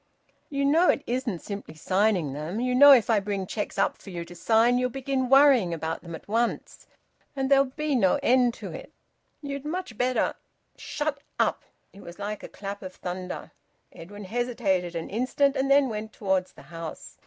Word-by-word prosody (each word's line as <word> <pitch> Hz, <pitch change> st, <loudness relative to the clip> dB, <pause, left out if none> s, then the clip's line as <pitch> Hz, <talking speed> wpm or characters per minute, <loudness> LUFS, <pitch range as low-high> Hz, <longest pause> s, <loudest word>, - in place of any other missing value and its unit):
"You 280 Hz, -1 st, -1 dB
know 325 Hz, +6 st, +4 dB
it 285 Hz, -, +2 dB
isn't 240 Hz, -7 st, -2 dB
simply 200 Hz, -6 st, -7 dB
signing 185 Hz, -3 st, +1 dB
them. 155 Hz, +9 st, -4 dB
You 250 Hz, +1 st, 0 dB
know 285 Hz, +3 st, +9 dB
if 245 Hz, -6 st, +6 dB
I 225 Hz, -3 st, +3 dB
bring 200 Hz, -1 st, -3 dB
cheques 210 Hz, +2 st, -4 dB
up -, -, +1 dB
for -, -, -11 dB
you 170 Hz, -2 st, -5 dB
to 175 Hz, -, -12 dB
sign 230 Hz, +6 st, +3 dB
you'll 250 Hz, 0 st, 0 dB
begin 265 Hz, 0 st, -2 dB
worrying 270 Hz, -10 st, +5 dB
about 160 Hz, 0 st, -4 dB
them 170 Hz, -2 st, -8 dB
at -, -, -13 dB
once, 230 Hz, +3 st, -2 dB, 0.5 s
and 270 Hz, -, -3 dB
and 265 Hz, -, -1 dB
there'll 275 Hz, 0 st, +6 dB
be 300 Hz, +3 st, -3 dB
no 195 Hz, -8 st, +3 dB
end 245 Hz, -1 st, +3 dB
to -, -, -8 dB
it. -, -, -9 dB, 0.5 s
You'd 280 Hz, -1 st, -5 dB
much 310 Hz, -, -5 dB
better 250 Hz, 0 st, +1 dB, 0.3 s
" -, -, -47 dB
"Shut 295 Hz, -1 st, -3 dB, 0.2 s
up!" -, -, +1 dB, 0.3 s
It 200 Hz, -, -13 dB
was 170 Hz, 0 st, -11 dB
like 205 Hz, +1 st, -5 dB
a -, -, -9 dB
clap 200 Hz, 0 st, -7 dB
of 185 Hz, -2 st, -8 dB
thunder. 180 Hz, 0 st, -6 dB, 0.4 s
Edwin 205 Hz, +5 st, -10 dB
hesitated 195 Hz, -5 st, -1 dB
an 165 Hz, -, -5 dB
instant 260 Hz, +5 st, +1 dB
and 270 Hz, 0 st, 0 dB
then 275 Hz, 0 st, +5 dB
went 220 Hz, -1 st, -5 dB
towards 190 Hz, -3 st, -1 dB
the -, -, -15 dB
house. 165 Hz, -1 st, -8 dB
225 Hz, 195 wpm, -26 LUFS, 185-265 Hz, 0.5 s, know